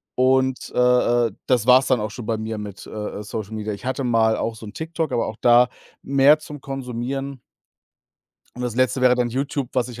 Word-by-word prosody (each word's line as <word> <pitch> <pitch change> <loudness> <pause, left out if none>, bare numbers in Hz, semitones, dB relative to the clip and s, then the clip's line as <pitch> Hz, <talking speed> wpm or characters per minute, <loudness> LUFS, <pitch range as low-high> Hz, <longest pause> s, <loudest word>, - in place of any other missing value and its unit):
und, 130 0 +1
äh, 125 -1 +3
äh, - - -15 0.2
das 120 -4 +2
war's 130 +1 +6
dann 130 -3 +2
auch 105 - -3
schon 115 0 -8
bei 115 -1 0
mir 110 0 -4
mit, 100 -2 -8
äh, - - -11 0.3
äh, 105 - -6
Social 110 0 -6
Media. 105 -1 -3
Ich 100 - -10
hatte 130 +1 -2
mal 115 -2 +2
auch 115 - -2
so 110 -1 -10
'n - - -10
TikTok, 160 -1 -3
aber 120 - 0
auch 110 - -6
da 120 +1 +6 0.4
mehr 140 +2 +5
zum 150 -2 -10
Konsumieren. 135 0 -5 1.1
Und 125 - -6
das 120 -3 -3
Letzte 130 0 +1
wäre 125 -1 +5
dann 125 -1 0
YouTube, 135 +1 -2
was 125 -1 0
ich 120 0 -9
125 Hz, 215 wpm, -22 LUFS, 115-130 Hz, 1.1 s, war's